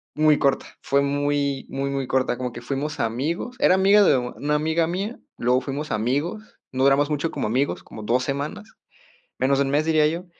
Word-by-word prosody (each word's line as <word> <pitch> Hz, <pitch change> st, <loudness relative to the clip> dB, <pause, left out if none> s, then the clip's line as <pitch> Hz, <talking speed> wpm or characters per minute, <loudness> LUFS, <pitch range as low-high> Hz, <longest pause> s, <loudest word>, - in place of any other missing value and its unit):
muy 155 Hz, -1 st, +4 dB
corta, 140 Hz, -1 st, +1 dB, 0.2 s
fue 140 Hz, +1 st, +2 dB
muy 140 Hz, -1 st, 0 dB
muy 135 Hz, +1 st, -2 dB
muy 135 Hz, -2 st, -2 dB
corta, 130 Hz, -2 st, 0 dB
como 125 Hz, -1 st, -3 dB
que 120 Hz, -, -8 dB
fuimos 140 Hz, +4 st, -3 dB
amigos. 145 Hz, -, -2 dB
Era 185 Hz, -, +5 dB
amiga 200 Hz, +2 st, +5 dB
de 175 Hz, -, +5 dB
una 140 Hz, +4 st, -2 dB
amiga 160 Hz, +2 st, +1 dB
mía, 195 Hz, +7 st, -3 dB, 0.2 s
luego 125 Hz, +2 st, +2 dB
fuimos 140 Hz, +3 st, -5 dB
amigos. 140 Hz, -, -1 dB, 0.3 s
No 130 Hz, 0 st, -1 dB
duramos 140 Hz, +2 st, +4 dB
mucho 150 Hz, +2 st, 0 dB
como -, -, -3 dB
amigos, 130 Hz, +6 st, -1 dB
como 110 Hz, -, -10 dB
2 120 Hz, +4 st, +1 dB
semanas, 145 Hz, +11 st, -4 dB, 0.7 s
menos 135 Hz, +1 st, +2 dB
de 140 Hz, -, +2 dB
1 135 Hz, -, -2 dB
mes 150 Hz, +2 st, +2 dB
diría 155 Hz, -2 st, +3 dB
yo, 170 Hz, +4 st, -3 dB
140 Hz, 195 wpm, -23 LUFS, 130-155 Hz, 0.7 s, Era